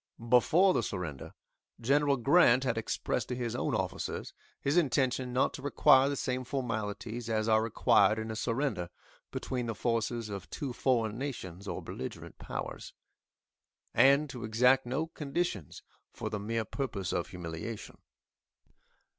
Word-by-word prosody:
Before 165 - +5
the - - +2
surrender, 90 - -5 0.4
General 140 +3 +3
Grant 130 -1 +5
had 125 -3 0
expressed 115 - -2
to 125 - -3
his 120 -2 -3
own - - 0
officers - - -3 0.3
his 140 +3 0
intention 130 -5 +2
not 125 +1 +2
to - - -7
require 135 -1 +5
the 145 - -1
same 130 -1 -2
formalities 115 -2 -3
as 110 -1 0
are 110 -1 +4
required 110 -1 +3
in 110 0 -3
a - - -4
surrender 115 -6 -1 0.4
between 125 -2 -3
the 115 - -3
forces 115 0 -1
of 100 -4 -6
two 135 -4 -4
foreign 120 -3 +1
nations 100 -9 -6
or - - -4
beligerant - - -7
powers, - - -6 1.0
and 140 +3 +5
to 125 -3 -7
exact 125 +4 +3
no 135 +6 -1
conditions 150 - -3 0.3
for 110 - -5
the 105 - -2
mere 110 +2 -2
purpose 105 -7 -3
of 85 - -1
humiliation. 90 +5 -7
120 Hz, 145 wpm, -31 LUFS, 110-135 Hz, 1.0 s, Before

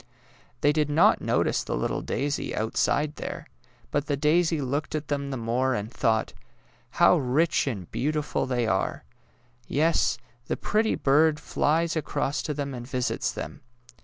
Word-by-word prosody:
They 145 - +4
did 150 -1 +1
not 145 +2 +4
notice - - +1
the - - -3
little - - -1
daisy 145 +1 -2
outside 145 +7 0
there, - - -6 0.5
but 145 0 -1
the 145 -2 0
daisy 160 +2 +2
looked 145 +3 -2
at 150 -1 -4
them 140 -1 -2
the 135 - -3
more 120 +3 0
and 105 +2 -4
thought, 110 -1 +1
^^ - - -29 0.6
How - - +6
rich 145 +5 +1
and 100 -10 -4
beautiful 150 +1 -1
they 125 -2 0
are. 95 -3 -1 0.6
Yes; 160 +4 +2 0.3
the - - -1
pretty 220 +1 +1
bird 150 +2 +3
flies 160 +2 0
across 150 -1 -1
to 150 - -3
them 140 -1 -3
and 120 -1 -7
visits 125 -2 -1
them. - - -7
145 Hz, 160 wpm, -26 LUFS, 125-155 Hz, 0.6 s, How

